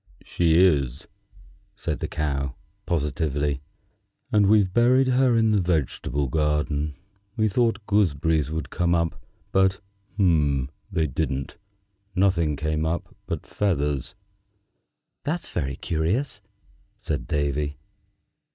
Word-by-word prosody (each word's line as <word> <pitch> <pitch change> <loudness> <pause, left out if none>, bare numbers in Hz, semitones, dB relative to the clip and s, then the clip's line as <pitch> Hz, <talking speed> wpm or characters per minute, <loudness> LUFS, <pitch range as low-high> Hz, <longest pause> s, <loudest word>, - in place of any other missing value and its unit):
"She 85 -2 +2
is," 70 -8 +2 0.7
said - - -3
the - - -2
Cow, 70 -3 -2 0.3
positively, 75 -3 -1 0.7
"and 105 -2 +4
we've 100 -3 +4
buried 130 +3 +4
her 125 -2 +4
in 110 -1 +3
the 105 -2 +3
vegetable 75 -4 -1
garden. 75 +1 0 0.4
We 110 -1 +3
thought 110 0 +1
gooseberries 80 -7 +2
would 80 -3 -4
come 85 -1 +1
up, 85 -1 -1 0.3
but 95 0 +3 0.4
they 80 -1 +1
didn't. 70 -1 -3 0.6
Nothing 90 -6 +2
came 75 +1 -1
up 80 +2 -3
but - - -4
feathers." 75 -9 -1 1.1
"That's 165 +4 -2
very 70 -4 -2
curious," 100 - -1 0.6
said - - -3
Davy. 75 0 -1
80 Hz, 105 wpm, -25 LUFS, 75-100 Hz, 1.1 s, and